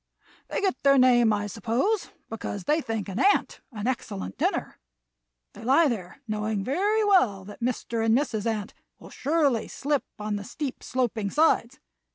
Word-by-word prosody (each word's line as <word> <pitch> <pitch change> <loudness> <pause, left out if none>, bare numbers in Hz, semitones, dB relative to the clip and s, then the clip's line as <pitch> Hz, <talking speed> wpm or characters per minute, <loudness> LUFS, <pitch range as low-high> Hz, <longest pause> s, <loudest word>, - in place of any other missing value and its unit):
They - - -2
get 385 -2 0
their 275 0 +5
name, 245 -3 +5
I 205 0 0
suppose, 235 - -1 0.2
because 205 -3 -5
they 305 - +2
think 225 -6 -3
an 195 +3 -4
ant 400 +5 +2
an 210 -3 -6
excellent 95 - -3
dinner. - - -1 0.7
They 215 - -11
lie 275 +7 +5
there 215 +2 -6
knowing 215 -1 -2
very 405 - +1
well 240 - +3
that 205 - -11
Mr. 235 -1 -1
and 225 +1 +4
Mrs. 235 -6 -1
Ant 215 -2 -2 0.2
will - - -14
surely 285 -7 +1
slip 285 0 -1
on 210 0 -3
the 205 - -6
steep 275 +5 -5
sloping 235 -5 -1
sides. 300 -3 +2
235 Hz, 165 wpm, -26 LUFS, 210-285 Hz, 0.7 s, their